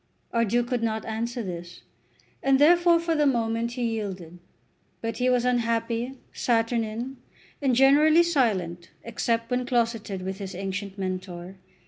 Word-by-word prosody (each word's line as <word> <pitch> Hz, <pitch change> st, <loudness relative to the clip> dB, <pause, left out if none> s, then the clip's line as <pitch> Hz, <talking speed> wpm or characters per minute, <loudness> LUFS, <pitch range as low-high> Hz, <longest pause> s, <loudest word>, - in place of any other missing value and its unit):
Our 230 Hz, -1 st, +3 dB
Duke 240 Hz, +3 st, +1 dB
could 250 Hz, -3 st, 0 dB
not 220 Hz, -1 st, -1 dB
answer 230 Hz, +2 st, -3 dB
this, 175 Hz, -2 st, -7 dB, 0.6 s
and 270 Hz, 0 st, +4 dB
therefore 340 Hz, +3 st, +5 dB
for 335 Hz, 0 st, 0 dB
the 300 Hz, -2 st, +3 dB
moment 230 Hz, -2 st, 0 dB
he 245 Hz, 0 st, -3 dB
yielded. 190 Hz, -7 st, -4 dB, 0.6 s
But 225 Hz, 0 st, -4 dB
he 250 Hz, 0 st, +2 dB
was 250 Hz, -1 st, +2 dB
unhappy, 230 Hz, 0 st, 0 dB, 0.2 s
saturnine, 230 Hz, +2 st, -1 dB, 0.4 s
and 265 Hz, -3 st, +2 dB
generally 300 Hz, +6 st, +6 dB
silent 195 Hz, -, 0 dB
except 230 Hz, 0 st, -1 dB
when 250 Hz, 0 st, +1 dB
closeted 230 Hz, -6 st, -1 dB
with 190 Hz, +1 st, -4 dB
his 190 Hz, -2 st, -6 dB
ancient 195 Hz, +1 st, -4 dB
mentor. 185 Hz, -1 st, -5 dB
230 Hz, 140 wpm, -26 LUFS, 195-250 Hz, 0.6 s, generally